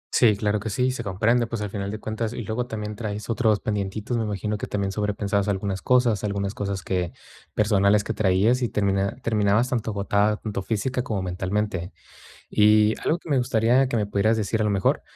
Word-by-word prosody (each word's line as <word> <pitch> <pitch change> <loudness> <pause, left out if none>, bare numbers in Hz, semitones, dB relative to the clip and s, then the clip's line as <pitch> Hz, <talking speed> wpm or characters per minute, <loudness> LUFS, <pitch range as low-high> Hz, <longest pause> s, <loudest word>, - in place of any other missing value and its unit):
Sí, 110 -4 +5
claro 105 0 0
que 110 +2 -4
sí, 125 +5 +1
se 125 -2 -4
comprende, 115 +4 +1
pues, 115 -2 -4
al 105 - -4
final 100 -1 -3
de 105 - -4
cuentas 110 +1 -3
y 120 - -5
luego 110 +4 -3
también, 105 -2 -5
traes 105 0 -4
otros 110 -3 +2
pendientitos, 105 +2 -2
me 115 -1 0
imagino 105 0 -3
que - - -4
también, 100 -1 -2
sobrepensabas 105 -1 -1
algunas 100 -1 -2
cosas, 125 -5 +2
algunas 100 -1 -2
cosas 100 -3 -3
que 90 -2 -2 0.4
personales 100 -1 +3
que 110 - -3
traías, 105 +5 +2
y 120 - 0
termina 100 +1 0
terminabas 110 +2 +2
tanto 115 -3 -1
agotada, 105 +1 +1
tanto 105 -3 -4
física 115 +6 -1
como 110 -6 -3
mentalmente. 95 0 -2 0.6
Y 105 0 +5
algo 170 - +1
que 165 - -12
me 140 - +3
gustaría 125 +1 +3
que 125 - -2
me 105 -2 +1
pudieras 100 +2 +2
decir, 110 +1 -1
a 110 - +1
lo - - +2
mejor, 100 -2 +1
105 Hz, 200 wpm, -24 LUFS, 100-115 Hz, 0.6 s, Sí